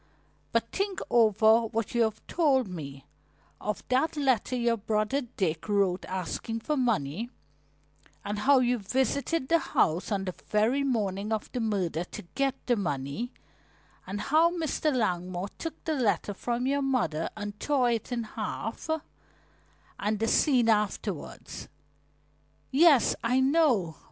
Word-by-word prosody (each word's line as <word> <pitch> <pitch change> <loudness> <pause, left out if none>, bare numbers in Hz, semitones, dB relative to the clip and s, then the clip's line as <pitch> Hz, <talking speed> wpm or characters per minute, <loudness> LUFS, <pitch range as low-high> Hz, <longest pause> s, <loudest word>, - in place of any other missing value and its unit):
But - - 0
think 395 -1 -2
over 225 0 +5
what 225 0 -3
you 235 - +2
have 220 -1 0
told 275 - +2
me 140 -7 -8 0.5
of 210 - -4
that 270 +5 +1
letter 260 -3 +1
your 235 -1 +2
brother 215 +5 0 0.2
Dick 165 0 -1
wrote 195 -3 +1
asking 190 +5 -4
for 300 +6 -1
money, 225 - 0 1.0
and 205 +1 -2
how 275 +4 +5
you 245 -1 +2
visited 265 +7 0
the 335 +3 +4
house 170 - 0
on 195 -2 0
the 185 - -3
very 220 +6 +2
morning 210 -5 -1
of 220 -1 -2
the 250 - -3
murder 190 -7 -1
to - - -9
get 275 -1 +1
the 245 - +3
money, 175 - -3 0.8
and 195 +2 -4
how 315 +7 +4
Mr. 320 -3 -1
Langmore 185 -6 -1
took 325 -1 -6
the 320 - -1
letter 225 -6 0
from 240 +5 -2
your 280 +1 +1
mother 240 - 0
and 205 0 -6
tore 265 -5 +2
it 230 +1 -2
in 235 -1 -1
half, 220 +4 -5 1.1
and 210 +1 0
the 225 +2 0
scene 250 -2 +3
afterwards." 210 -5 -2 1.0
"Yes, 290 -3 +5
I 250 +3 +2
know. 260 - +2
225 Hz, 140 wpm, -28 LUFS, 200-265 Hz, 1.1 s, over